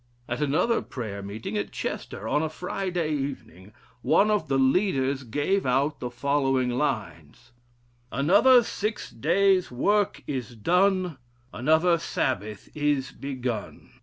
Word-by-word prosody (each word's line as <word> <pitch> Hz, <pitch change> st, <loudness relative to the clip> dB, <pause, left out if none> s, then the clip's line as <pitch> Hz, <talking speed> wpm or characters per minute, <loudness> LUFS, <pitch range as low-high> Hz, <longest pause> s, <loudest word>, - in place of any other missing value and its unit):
At 120 Hz, +5 st, -3 dB
another 160 Hz, +11 st, +2 dB
prayer 105 Hz, -6 st, -6 dB
meeting 105 Hz, +2 st, -6 dB
at 105 Hz, -, -4 dB
Chester, 105 Hz, -, -5 dB
on 150 Hz, +6 st, +1 dB
a 160 Hz, -, -1 dB
Friday 180 Hz, 0 st, -3 dB
evening, 130 Hz, -, -5 dB, 0.3 s
one 210 Hz, -, +3 dB
of 205 Hz, -7 st, 0 dB
the 135 Hz, -1 st, +1 dB
leaders 135 Hz, -1 st, +2 dB
gave 145 Hz, -, 0 dB
out 135 Hz, +3 st, +1 dB
the 125 Hz, -, -4 dB
following 135 Hz, 0 st, +1 dB
lines: 120 Hz, -, -3 dB, 0.6 s
'Another 205 Hz, -, +5 dB
six 215 Hz, -1 st, -4 dB
days' 185 Hz, -, +2 dB
work 190 Hz, +4 st, +1 dB
is 125 Hz, -4 st, -4 dB
done; 180 Hz, -, +1 dB, 0.3 s
Another 160 Hz, +6 st, +3 dB
Sabbath 110 Hz, -, -2 dB
is 145 Hz, -3 st, 0 dB
begun.' 125 Hz, -5 st, -5 dB
140 Hz, 125 wpm, -26 LUFS, 125-180 Hz, 0.6 s, Another